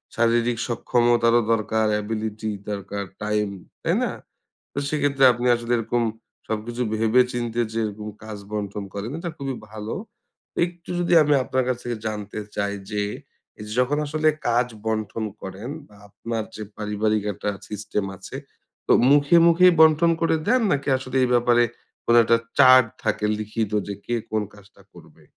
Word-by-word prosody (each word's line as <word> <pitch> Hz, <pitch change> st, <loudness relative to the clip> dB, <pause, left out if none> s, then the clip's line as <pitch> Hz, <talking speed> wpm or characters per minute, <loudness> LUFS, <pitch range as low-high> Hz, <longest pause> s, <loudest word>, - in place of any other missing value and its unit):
শারীরিক 120 Hz, 0 st, +2 dB
সক্ষমতারও 120 Hz, 0 st, +3 dB
দরকার, 110 Hz, 0 st, +1 dB
অ্যাবিলিটি 110 Hz, 0 st, -3 dB, 0.2 s
দরকার, 100 Hz, 0 st, -4 dB, 0.2 s
টাইম, 105 Hz, -1 st, 0 dB, 0.3 s
তাই -, -, +1 dB
না? -, -, -1 dB, 0.6 s
তো -, -, -5 dB
সেক্ষেত্রে 145 Hz, -2 st, +1 dB
আপনি 120 Hz, +1 st, -3 dB
আসলে 120 Hz, +1 st, -4 dB
এরকম 120 Hz, +1 st, 0 dB, 0.5 s
সবকিছু 115 Hz, +3 st, -3 dB
ভেবে 115 Hz, +3 st, +4 dB
চিন্তে 120 Hz, -1 st, -2 dB
যে 115 Hz, -, -2 dB
এরকম 105 Hz, 0 st, -5 dB, 0.2 s
কাজ 110 Hz, -1 st, -7 dB
বন্টন 105 Hz, -1 st, -3 dB
করেন 100 Hz, +4 st, -4 dB
এটা 170 Hz, 0 st, -4 dB
খুবই 135 Hz, -1 st, -3 dB, 0.2 s
ভালো। 110 Hz, 0 st, -5 dB, 0.7 s
একটু 175 Hz, 0 st, -9 dB
যদি 175 Hz, 0 st, 0 dB
আমি 150 Hz, 0 st, +3 dB
আপনার 130 Hz, 0 st, 0 dB
কাছ 125 Hz, -, +1 dB
থেকে 120 Hz, -1 st, -3 dB
জানতে 105 Hz, -1 st, -4 dB, 0.2 s
চাই 100 Hz, 0 st, -1 dB, 0.2 s
যে, 105 Hz, -1 st, -1 dB, 0.6 s
এইযে 105 Hz, 0 st, -8 dB
যখন 135 Hz, +4 st, +1 dB
আসলে 155 Hz, +1 st, +1 dB, 0.2 s
কাজ 120 Hz, +1 st, +3 dB, 0.2 s
বন্টন 110 Hz, 0 st, -2 dB, 0.2 s
করেন 95 Hz, +6 st, -7 dB, 0.2 s
বা 105 Hz, -, -19 dB
আপনার 115 Hz, +2 st, -4 dB
যে 110 Hz, -, -6 dB, 0.2 s
পারিবারিক 105 Hz, 0 st, 0 dB
একটা 100 Hz, -, -5 dB, 0.2 s
সিস্টেম 105 Hz, -1 st, -3 dB
আছে, -, -, -9 dB, 0.5 s
তো -, -, +4 dB, 0.2 s
মুখে 145 Hz, +3 st, +5 dB
মুখেই 180 Hz, +2 st, +6 dB
বন্টন 160 Hz, +1 st, +6 dB
করে 165 Hz, -1 st, +2 dB
দেন 250 Hz, +4 st, +4 dB
নাকি 140 Hz, 0 st, -1 dB
আসলে 130 Hz, 0 st, -5 dB
এই 125 Hz, -, +3 dB
ব্যাপারে 120 Hz, 0 st, +4 dB, 0.4 s
কোন 120 Hz, -, +3 dB
একটা 115 Hz, +1 st, +4 dB, 0.2 s
চার্ট 130 Hz, -1 st, +8 dB, 0.2 s
থাকে 110 Hz, -1 st, 0 dB
লিখিত 110 Hz, 0 st, -3 dB, 0.2 s
যে 100 Hz, -, -3 dB
কে 120 Hz, -, -2 dB, 0.2 s
কোন 110 Hz, -1 st, 0 dB
কাজটা 100 Hz, 0 st, -18 dB
করবে? -, -, -17 dB
115 Hz, 155 wpm, -23 LUFS, 105-130 Hz, 0.7 s, চার্ট